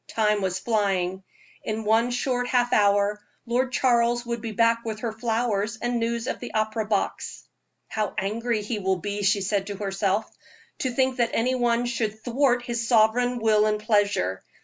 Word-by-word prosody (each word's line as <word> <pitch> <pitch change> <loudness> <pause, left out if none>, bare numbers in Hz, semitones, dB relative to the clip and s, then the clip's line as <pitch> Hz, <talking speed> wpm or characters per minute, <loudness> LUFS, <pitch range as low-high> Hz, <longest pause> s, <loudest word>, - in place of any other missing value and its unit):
Time 210 -2 +1
was 185 -1 -1
flying. 190 -3 0 0.4
In 220 0 -3
one 225 +3 +3
short 245 0 -1
half 245 -1 +1
hour 205 0 +3 0.2
Lord 255 +2 0
Charles 240 -2 +2
would 235 -1 -3
be 225 -1 -4
back 230 +2 +2
with 220 -2 -5
her 235 - -2
flowers 225 -1 -1
and 240 0 -1
news 230 0 -1
of - - -3
the 245 - -8
opera 215 0 0
box. 205 -2 -2 0.4
"How 215 -2 -3
angry 220 +2 -1
he 210 +1 -3
will 190 -1 +1
be," 205 +3 -4
she 200 +1 +2
said 195 0 -1
to 205 - -4
herself, 195 +1 -1 0.5
"to 260 - 0
think 260 +1 0
that 235 -2 +2
any 250 +3 +1
one 240 -1 +1
should 225 -3 -2
thwart 245 0 +2
his 235 -1 -3
sovereign 245 +2 +3
will 215 -2 +3
and 210 0 0
pleasure. 205 - +1
225 Hz, 175 wpm, -25 LUFS, 205-240 Hz, 0.5 s, one